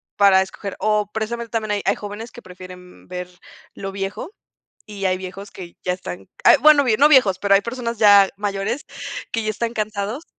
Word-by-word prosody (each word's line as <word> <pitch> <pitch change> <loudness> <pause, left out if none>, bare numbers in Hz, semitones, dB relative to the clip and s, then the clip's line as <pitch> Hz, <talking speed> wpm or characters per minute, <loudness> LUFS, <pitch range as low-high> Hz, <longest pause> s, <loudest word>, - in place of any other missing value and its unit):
para 195 -2 +5
escoger. 190 +1 -8
O 210 -1 0
precisamente, 230 +2 -4
también, 220 -2 -2
hay 205 -1 -1
hay - - +2
jóvenes, 210 +3 -8
que 240 - -12
prefieren 180 0 -13
ver 180 0 -6 0.5
lo 195 0 -6
viejo. 195 - -5 0.6
Y 205 -2 -7
hay 185 -1 +1
viejos, 190 +2 -8
que 175 -3 -11
ya 180 - 0
están 95 - -7 0.2
Ah, - - +8
bueno, 300 0 +6
no 295 - +6
viejos, 245 -11 +5
pero 200 +1 +3
hay 195 - +5
personas 235 +1 -5
ya 205 -2 +7
mayores, 205 +5 -3 0.4
que 225 -2 -2
ya 215 - 0
están 230 +2 -3
cansados. 215 +5 -3
205 Hz, 185 wpm, -21 LUFS, 190-225 Hz, 0.6 s, Ah